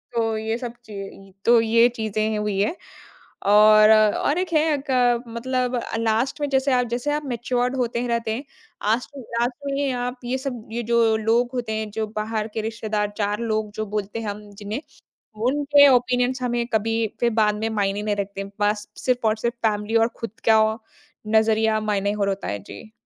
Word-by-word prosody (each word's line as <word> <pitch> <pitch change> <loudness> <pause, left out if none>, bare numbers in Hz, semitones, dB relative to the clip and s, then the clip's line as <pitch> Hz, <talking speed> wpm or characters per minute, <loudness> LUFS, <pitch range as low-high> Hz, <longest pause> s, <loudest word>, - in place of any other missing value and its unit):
तो 225 -1 0
ये 220 +1 -2
सब 240 -2 -6
ची 195 -2 -9
तो 235 0 +6
ये 230 +1 +4
चीज़ें 215 0 -1
हुई 210 -2 -1
हैं। 210 - +1 0.8
और 215 +1 +7
और 215 +8 +3
एक 365 -2 -2
है 310 -1 +3
क 245 -2 +3
मतलब 250 +1 -1 0.2
लास्ट 230 +6 0
में 290 - +1
जैसे 265 0 +1
आप, 250 -1 +2
जैसे 240 +5 -2
आप 300 0 -2
मैच्युअर्ड 250 0 -1
होते 240 -2 -1
हैं, 245 - -2
रहते 230 -1 -1
हैं। 265 - -5 0.5
आस्ट 240 +2 -3
लास्ट 240 0 -2
में 280 - -2
ये 280 -2 0
आप 245 0 -3
ये 255 +2 -1
सब 255 -4 -6
ये 235 +1 -3
जो 230 -1 +4
लोग 230 +3 +1
होते 240 -3 -3
हैं, 215 0 -3
जो 220 +1 -2
बाहर 215 0 -2
के 220 - -2
रिश्तेदार, 215 -2 -2
चार 205 0 -1
लोग 215 -2 -1
जो 215 - -1
बोलते 210 +2 -3
हैं 225 - -5
हम 205 0 -8
जिन्हें, 210 +6 -5 0.7
उनके 285 +1 +5
ओपिनियंस 250 +1 +1
हमें 240 -1 0
कभी 225 +1 +1 0.2
फिर 240 - +3
बाद 210 -1 +3
में 220 +1 -2
मायने 205 -2 -1
नहीं 210 -1 0
रखते। 200 -1 -4 0.2
बस 210 0 0 0.2
सिर्फ़ 250 -3 +1
और 215 - +2
सिर्फ़ 235 - 0
फ़ैमिली 210 +1 -2
और 225 0 +5
खुद 225 -1 -7
का 220 0 +6 0.7
नज़रिया 220 0 +3
मायने 205 -1 0
और 200 -1 0
होता 195 0 -3
है। 100 0 -3
जी। 215 - -11
225 Hz, 190 wpm, -23 LUFS, 215-245 Hz, 0.8 s, और